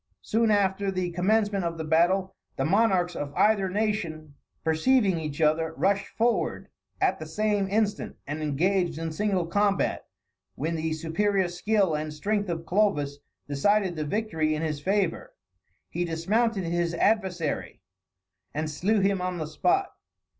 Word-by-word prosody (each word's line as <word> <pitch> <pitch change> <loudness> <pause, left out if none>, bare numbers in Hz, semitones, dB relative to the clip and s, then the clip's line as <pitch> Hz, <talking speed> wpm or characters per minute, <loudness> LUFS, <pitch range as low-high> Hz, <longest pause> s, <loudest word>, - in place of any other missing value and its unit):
Soon 225 +1 +1
after 200 -1 +2
the 185 -2 -2
commencement 200 +2 +1
of 170 -1 -2
the 160 - -3
battle, 180 +4 +2 0.2
the 135 - 0
monarchs 185 -1 +2
of 145 -1 -4
either 205 -3 +3
nation 180 -7 -2 0.3
perceiving 190 +3 +2
each 150 -2 -5
other, 160 +1 +2
rushed 200 +1 +1
forward 235 +1 -1 0.3
at 385 0 +1
the 155 - -7
same 205 +3 0
instant, 210 0 0
and 145 +2 -4
engaged 170 +3 +1
in 165 0 -3
single 190 0 0
combat, 200 +3 0 0.5
when 160 +4 -2
the 160 0 -1
superior 185 +5 0
skill 190 +1 +1
and 150 0 -3
strength 205 +4 -1
of 165 -1 -3
Clovis 155 -8 +1 0.3
decided 185 +6 +1
the 155 - -2
victory 160 -3 -1
in 155 - -3
his 150 -2 -2
favor; 205 - -1 0.5
he 175 - -2
dismounted 195 +6 0
his 170 0 -1
adversary, 180 -5 0 0.8
and 155 +1 -2
slew 200 +8 +1
him 195 -1 +1
on 180 0 -2
the 160 - -3
spot. 355 - +1
180 Hz, 145 wpm, -27 LUFS, 160-205 Hz, 0.8 s, either